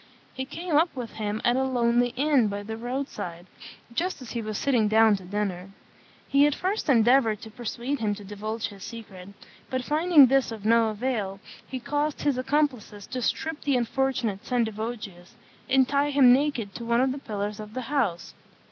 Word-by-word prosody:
He 260 0 -4
came 330 +3 -4
up 325 +1 +2
with 245 -4 -5
him 215 0 -2
at 240 - +4
a 265 - +2
lonely 245 -2 +2
inn 275 -3 +3
by 205 0 -4
the 220 +2 -5
road 250 +4 -3
side, 175 -7 -7 0.5
just 360 +9 -2
as 255 -4 -9
he 235 - -3
was 215 -1 -4
sitting 245 -6 +2
down 220 0 +5
to 190 - -12
dinner. 190 -1 -3 0.6
He 280 +1 +5
at 295 - 0
first 375 -1 -2
endeavoured 235 -3 +4
to 220 - -10
persuade 240 +4 -4
him 210 -2 0
to 205 - -10
divulge 215 +3 -4
the 200 -2 -13
secret; 195 -3 -9 0.4
but 255 -1 -2
finding 310 +1 +6
this 265 -1 +2
of 215 -2 -8
no 230 0 +4
avail, 215 -3 -2 0.3
he 260 - -5
caused 290 +3 -2
his 280 -3 +1
accomplices 255 -7 -1
to 255 - -5
strip 320 +6 -2
the 280 -3 +1
unfortunate 240 -4 -1
Sendivogius 220 -6 -3 0.3
and 265 -1 +4
tie 285 +1 +1
him 270 -4 +6
naked 255 -7 0
to 235 - -7
one 235 0 +2
of 260 0 +2
the 275 - -5
pillars 210 -3 -4
of 215 0 -9
the 255 - -2
house. 235 -10 -1
235 Hz, 190 wpm, -26 LUFS, 210-270 Hz, 0.6 s, finding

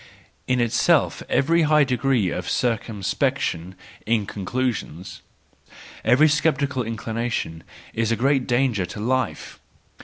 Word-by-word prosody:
In 125 -1 +1
itself 125 +7 +2
every 165 +5 +3
high 150 -1 +4
degree 125 -6 +1
of 90 - -4
circumspection 100 -6 -1 0.3
in 110 -2 +1
conclusions, 100 -4 -4 0.8
every 145 +5 +5
sceptical 150 -3 +1
inclination, 115 -6 -3 0.3
is 115 0 0
a - - +3
great 135 +2 +1
danger 120 -7 +1
to 105 - -8
life. 130 +4 -2
120 Hz, 110 wpm, -23 LUFS, 105-135 Hz, 0.8 s, every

